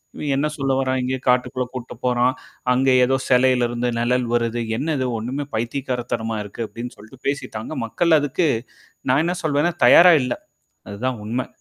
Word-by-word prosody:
இவன் 145 -2 -3
என்ன 140 +3 +1
சொல்ல 135 -1 0
வறான் 130 -1 0
இங்கேயே 130 +1 -2
காட்டுக்குள்ள 125 0 +1
கூட்டிட்ட 125 -1 -7
போறான். 125 0 +2 0.4
அங்க 130 +1 +2 0.2
ஏதோ 135 +1 +1
சிலையில 125 -1 +4
இருந்து 120 +1 -2
நிழல் 125 +1 +1
வருது, 120 0 0 0.2
என்ன 155 +4 -1
இது 130 - 0
ஒண்ணுமே 130 +6 -4
பைத்தியிகாரத்தரமா 120 -2 -2
இருக்கு 105 +3 -6
அப்டின்னு 120 +1 -8
சொல்லிட்டு 110 +5 -16
பேசிட்டாங்க. 135 -6 -4
மக்கள் 160 +7 +3
அதுக்கு 145 +4 0 0.6
நான் 140 +5 +4
என்ன 175 +1 0
சொல்வேன்னா 155 +2 +1
தயாரா 175 0 +8
இல்ல. 125 - -1 0.6
அதுதான் 125 +4 -3
உண்மை. 120 +4 -2
125 Hz, 160 wpm, -21 LUFS, 120-140 Hz, 0.6 s, தயாரா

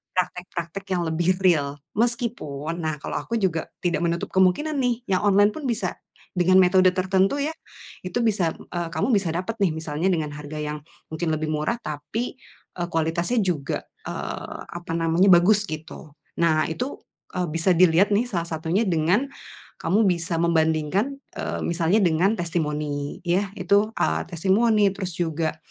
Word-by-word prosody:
praktek-praktek 180 0 -3
yang 175 - 0
lebih 170 +3 +1
real. 145 -6 +3 0.2
Meskipun, 195 - -2
nah 155 -2 -1
kalau - - -2
aku 235 - -4
juga 185 -7 0 0.2
tidak 175 -4 +1
menutup 170 0 -2
kemungkinan 190 +12 +2
nih 245 -2 0
yang 185 - +2
online 205 +1 +5
pun 285 +2 -5
bisa 235 - -2 0.4
dengan 185 +1 +4
metode 185 +1 +5
tertentu 190 +4 +2
ya 310 - -1 0.6
itu 235 +7 -1
bisa, 195 -7 +1 0.2
eee, 175 -1 -2
kamu 255 - +1
bisa 200 -4 +2
dapet 190 +6 -3
nih 185 -6 +2
misalnya 160 +2 -2
dengan 160 -5 0
harga 150 +1 -8
yang 150 0 -4 0.3
mungkin 160 +2 -2
lebih 155 0 -2
murah 155 +9 0
tapi, 220 - -4 0.4
eee, 175 - -1
kualitasnya 170 +8 0
juga, 155 -7 -2 0.2
eee, - - -5
apa 175 -1 -7
namanya, 165 +3 +3
bagus 195 +3 +5
gitu. 155 -1 -8 0.2
Nah, 160 -2 +3
itu, 250 +12 -3 0.4
eee, 180 -1 0
bisa 165 +3 +2
dilihat 180 +3 +5
nih 215 - +3
salah 170 -2 -1
satunya 165 +6 0
dengan 180 - +2 0.5
kamu 210 +1 +3
bisa 170 -1 -1
membandingkan, 170 - +1 0.2
eee, - - -3
misalnya 170 +5 +2
dengan 180 +3 +3
testimoni. 150 -4 -2
Yah, 185 +3 +1
itu, 200 +3 +2
eee, 80 +1 +1
testimoni, 205 +4 +3
terus 190 -3 -5
juga, 160 -2 -1
175 Hz, 155 wpm, -24 LUFS, 160-200 Hz, 0.6 s, online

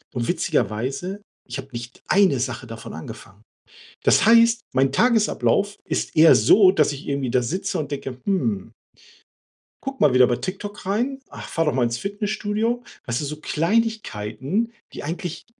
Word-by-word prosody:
Und 120 -1 -1
witzigerweise, 170 - -1 0.3
ich 125 +3 -5
habe 135 - -8
nicht 120 +1 -8
1 185 -10 +4
Sache 125 -1 -3
davon 115 0 -9
angefangen. 100 +5 -10 0.6
Das - - +4
heißt, 230 0 +6
mein 135 0 +3
Tagesablauf 210 - +2
ist - - -2
eher 160 +1 +8
so, 190 -2 +6
dass 150 -5 +2
ich 140 - -9
irgendwie 140 -3 -1
da 125 - +3
sitze 170 +10 -2
und 145 -2 -4
denke: 135 -2 -5
„Hm.“ 120 - -1 1.1
„Guck 270 0 -5
mal 145 -4 +4
wieder 125 -1 +6
bei 120 - 0
TikTok 200 +1 -6
rein, 245 +8 -1
ach, - - -9
fahr 165 0 0
doch 150 - +1
mal 125 -2 +1
ins 120 0 0
Fitnessstudio,“ 210 - -2 0.2
weißt 120 -1 -2
du, 150 - -3
so 150 +2 -4
Kleinigkeiten, 205 - -1 0.2
die - - -7
eigentlich 170 +2 -5
160 Hz, 160 wpm, -23 LUFS, 125-205 Hz, 1.1 s, eher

